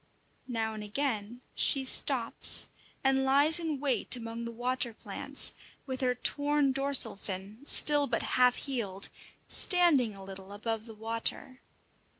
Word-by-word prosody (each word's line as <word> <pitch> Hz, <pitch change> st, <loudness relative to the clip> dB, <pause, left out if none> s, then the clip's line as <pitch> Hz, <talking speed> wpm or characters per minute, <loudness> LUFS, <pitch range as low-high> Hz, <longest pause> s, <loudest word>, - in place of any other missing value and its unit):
Now 225 Hz, -3 st, -4 dB
and 215 Hz, -1 st, -9 dB
again 230 Hz, 0 st, -5 dB
she 270 Hz, -2 st, -1 dB
stops -, -, +4 dB, 0.3 s
and 265 Hz, 0 st, +1 dB
lies 285 Hz, +5 st, +3 dB
in 315 Hz, -4 st, -5 dB
wait 275 Hz, -2 st, -1 dB
among 230 Hz, -1 st, -8 dB
the 235 Hz, -, -7 dB
water 245 Hz, 0 st, -3 dB
plants, -, -, 0 dB, 0.3 s
with 260 Hz, -1 st, -6 dB
her 250 Hz, -1 st, -1 dB
torn, 285 Hz, +2 st, -1 dB
dorsal 270 Hz, -3 st, +3 dB
fin, 195 Hz, +2 st, -8 dB
still 290 Hz, -1 st, +6 dB
but 230 Hz, -, -2 dB
half 250 Hz, 0 st, +1 dB
healed, 210 Hz, -8 st, -5 dB, 0.4 s
standing 305 Hz, -, +2 dB
a 195 Hz, -, -12 dB
little 195 Hz, 0 st, -11 dB
above 225 Hz, +2 st, -5 dB
the 225 Hz, -, -12 dB
water. 230 Hz, +4 st, -1 dB
250 Hz, 140 wpm, -28 LUFS, 220-275 Hz, 0.4 s, still